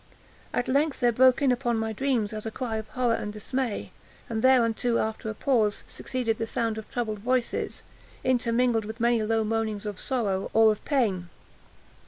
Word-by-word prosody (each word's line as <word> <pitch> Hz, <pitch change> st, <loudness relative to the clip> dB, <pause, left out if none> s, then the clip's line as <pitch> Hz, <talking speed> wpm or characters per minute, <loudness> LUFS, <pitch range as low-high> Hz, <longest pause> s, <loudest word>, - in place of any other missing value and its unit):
At 245 Hz, -, -1 dB
length 285 Hz, +3 st, +1 dB
there 240 Hz, -1 st, +4 dB
broke 255 Hz, +3 st, +4 dB
in 270 Hz, -, +4 dB
upon 240 Hz, -2 st, 0 dB
my 220 Hz, 0 st, -2 dB
dreams 230 Hz, -3 st, 0 dB
a 215 Hz, +1 st, -4 dB
cry 225 Hz, -1 st, -3 dB
as -, -, -1 dB
of 220 Hz, -, -8 dB
horror 245 Hz, 0 st, 0 dB
and 210 Hz, -, -3 dB
dismay; 235 Hz, +2 st, -3 dB, 0.4 s
and 220 Hz, -1 st, -1 dB
thereunto, 240 Hz, -2 st, +3 dB
after 220 Hz, 0 st, -2 dB
a 215 Hz, -, -5 dB
pause, 220 Hz, -5 st, +1 dB
succeeded 235 Hz, -4 st, -3 dB
the 225 Hz, -, -1 dB
sound 225 Hz, -1 st, -1 dB
of 220 Hz, -, -11 dB
troubled 220 Hz, -4 st, -3 dB
voices, 250 Hz, +2 st, -1 dB, 0.4 s
intermingled 240 Hz, -2 st, +2 dB
with 220 Hz, +2 st, -7 dB
many 235 Hz, -1 st, +3 dB
low 220 Hz, +1 st, +1 dB
moanings 220 Hz, -1 st, -2 dB
of 205 Hz, -3 st, -5 dB
sorrow 205 Hz, -7 st, -1 dB
or 220 Hz, -1 st, +7 dB
of 210 Hz, -, -5 dB
pain. 205 Hz, -, 0 dB
230 Hz, 180 wpm, -27 LUFS, 220-250 Hz, 0.4 s, or